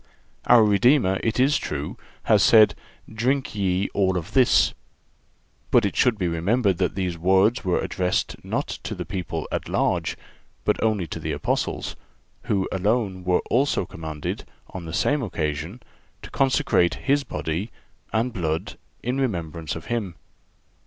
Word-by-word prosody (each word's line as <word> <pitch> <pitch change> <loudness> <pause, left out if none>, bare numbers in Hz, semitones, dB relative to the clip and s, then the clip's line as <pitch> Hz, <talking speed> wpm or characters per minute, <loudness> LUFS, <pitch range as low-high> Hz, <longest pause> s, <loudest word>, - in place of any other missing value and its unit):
Our 115 -2 +7
Redeemer, 105 -1 +3
it 115 +1 -1
is 140 +3 +4
true, 75 0 -4 0.3
has - - +4
said: 110 -2 +7 0.3
"Drink 125 +5 -1
ye 95 -2 0
all 95 -2 +2
of 90 +4 -5
this." 130 -2 +4 1.0
But 120 -3 +4
it 100 - -2
should 125 -5 +3
be 90 -3 -1
remembered 95 +4 +1
that - - 0
these 90 -3 -2
words 95 +7 +3
were 90 -2 +1
addressed 90 -1 -2
not - - -2
to - - -5
the - - -5
people 85 -4 -4
at - - -3
large, - - 0 0.5
but - - +1
only 110 -5 +1
to - - -6
the - - -3
Apostles, - - -2 0.5
who 95 -2 0
alone 100 -1 0
were 90 -1 +2
also 130 -5 +2
commanded, 80 -3 -5 0.3
on 90 -2 -7
the 80 - -6
same 145 - +1
occasion, 80 - -3 0.4
to - - -10
consecrate 135 -9 +2
His 140 +1 +3
body 85 - -3 0.4
and 115 +3 0
blood 80 -5 -3 0.2
in 125 +3 -1
remembrance 85 - -3
of 80 - -8
Him. 105 -8 -3
95 Hz, 150 wpm, -24 LUFS, 85-120 Hz, 1.0 s, Our